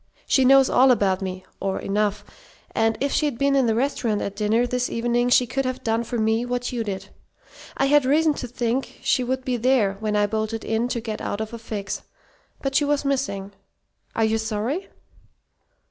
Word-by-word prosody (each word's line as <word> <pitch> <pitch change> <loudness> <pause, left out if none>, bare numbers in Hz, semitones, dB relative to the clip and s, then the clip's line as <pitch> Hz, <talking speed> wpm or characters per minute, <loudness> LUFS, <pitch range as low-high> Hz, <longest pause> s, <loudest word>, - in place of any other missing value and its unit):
She 265 - +3
knows 270 0 +7
all 260 +1 +5
about 200 -6 +2
me 185 -1 -5
or 195 -1 -2
enough 205 0 -1 0.5
and 225 0 +1
if 280 +1 0
she'd 295 -6 0
been 275 +1 +2
in 265 -3 +3
the 220 - +2
restaurant 235 -4 0
at 200 - -4
dinner 215 +3 +2
this 250 0 -1
evening 240 +1 0
she 250 0 +5
could 270 +3 -2
have 255 0 -3
done 225 +1 0
for 235 +1 -4
me 220 +1 +1
what 245 0 -2
you 240 -2 -2
did. 195 -2 -5 0.7
I - - +2
had 290 +1 +4
reason 305 +4 +3
to 250 - -4
think 245 +2 -2
she 255 - +2
would 260 +1 -2
be 250 -1 0
there 230 -5 +2
when 215 -1 -1
I 205 0 +3
bolted 220 +1 -3
in 225 +2 0
to 240 -1 -2
get 220 -1 -5
out 205 - -3
of 220 +1 -4
a 230 - -6
fix. 205 -3 -5 0.6
But 270 -1 -1
she 290 - +3
was 290 0 0
missing. 255 -8 -1 0.6
Are 225 - +2
you 220 0 +1
sorry?" 220 - -2
235 Hz, 200 wpm, -23 LUFS, 215-260 Hz, 0.7 s, knows